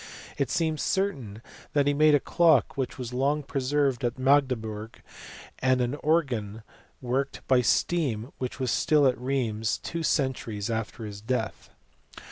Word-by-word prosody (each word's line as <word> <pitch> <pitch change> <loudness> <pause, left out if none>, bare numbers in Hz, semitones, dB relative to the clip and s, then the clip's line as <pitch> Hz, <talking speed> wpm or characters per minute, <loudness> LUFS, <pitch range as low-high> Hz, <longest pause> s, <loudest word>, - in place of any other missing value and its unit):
It 140 -4 -1
seems 160 -2 0
certain 135 - -2 0.3
that 145 -1 +3
he 145 - +2
made 150 +1 +5
a - - +4
clock 160 -3 +3
which 135 -2 -3
was 125 -2 -6
long 140 +4 +1
preserved 135 -1 0
at 120 0 -1
Magdeburg, 125 -6 0 0.6
and 130 0 +2
an 125 +1 0
organ 125 -9 -1 0.4
worked 130 +2 -2
by 130 -1 +4
steam 125 -4 0
which 125 +1 -4
was 130 -3 0
still 150 +4 +3
at 130 -2 +4
Rheims 115 -5 -1
two 170 - -5
centuries 125 -8 -1
after 110 0 -4
his 105 -1 -8
death. 110 0 -3
130 Hz, 145 wpm, -27 LUFS, 115-145 Hz, 0.6 s, made